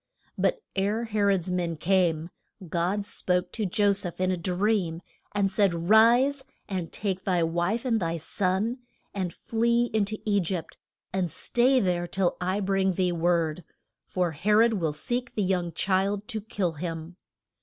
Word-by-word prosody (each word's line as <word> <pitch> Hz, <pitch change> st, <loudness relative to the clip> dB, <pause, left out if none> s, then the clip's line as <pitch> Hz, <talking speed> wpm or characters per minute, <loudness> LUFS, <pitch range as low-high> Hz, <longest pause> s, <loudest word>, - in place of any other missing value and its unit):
] -, -, -39 dB
But 470 Hz, -, +1 dB
ere 205 Hz, +4 st, 0 dB
He 215 Hz, -2 st, -2 dB
rod's 190 Hz, -3 st, +2 dB
men 175 Hz, -2 st, -1 dB
came, 170 Hz, -1 st, +1 dB, 0.4 s
God 180 Hz, +5 st, -1 dB
spoke 180 Hz, -3 st, 0 dB
to 215 Hz, -3 st, -2 dB
Jo 205 Hz, +2 st, +3 dB
seph 185 Hz, -3 st, -4 dB
in 185 Hz, 0 st, +1 dB
a -, -, +1 dB
dream, 180 Hz, -1 st, 0 dB, 0.3 s
and 195 Hz, -1 st, +2 dB
said, 185 Hz, -3 st, +1 dB
Rise, 245 Hz, +5 st, +5 dB, 0.2 s
and 180 Hz, -4 st, -4 dB
take 190 Hz, -3 st, -3 dB
thy 180 Hz, -3 st, +1 dB
wife 175 Hz, +9 st, 0 dB
and 230 Hz, -3 st, +2 dB
thy 165 Hz, -2 st, -1 dB
son, 195 Hz, -, -1 dB, 0.3 s
and 185 Hz, -3 st, -2 dB
flee 235 Hz, +5 st, 0 dB
in 215 Hz, -2 st, +2 dB
to 215 Hz, +2 st, -4 dB
E 205 Hz, -1 st, +3 dB
gypt, 180 Hz, -2 st, -3 dB, 0.4 s
and 185 Hz, -2 st, 0 dB
stay 255 Hz, -, +2 dB
there 175 Hz, -4 st, 0 dB
till 185 Hz, 0 st, 0 dB
I 185 Hz, +3 st, 0 dB
bring 190 Hz, -1 st, +1 dB
thee 180 Hz, 0 st, +1 dB
word; 170 Hz, -1 st, 0 dB, 0.4 s
for 180 Hz, -2 st, 0 dB
He 170 Hz, +8 st, -1 dB
rod 225 Hz, +2 st, +5 dB
will 165 Hz, -7 st, 0 dB
seek 240 Hz, +11 st, -3 dB
the 210 Hz, -, +1 dB
young 180 Hz, -2 st, 0 dB
child 195 Hz, +4 st, 0 dB
to 220 Hz, -3 st, -3 dB
kill 200 Hz, -4 st, -2 dB
him. 165 Hz, +1 st, -6 dB
190 Hz, 170 wpm, -27 LUFS, 175-210 Hz, 0.4 s, Rise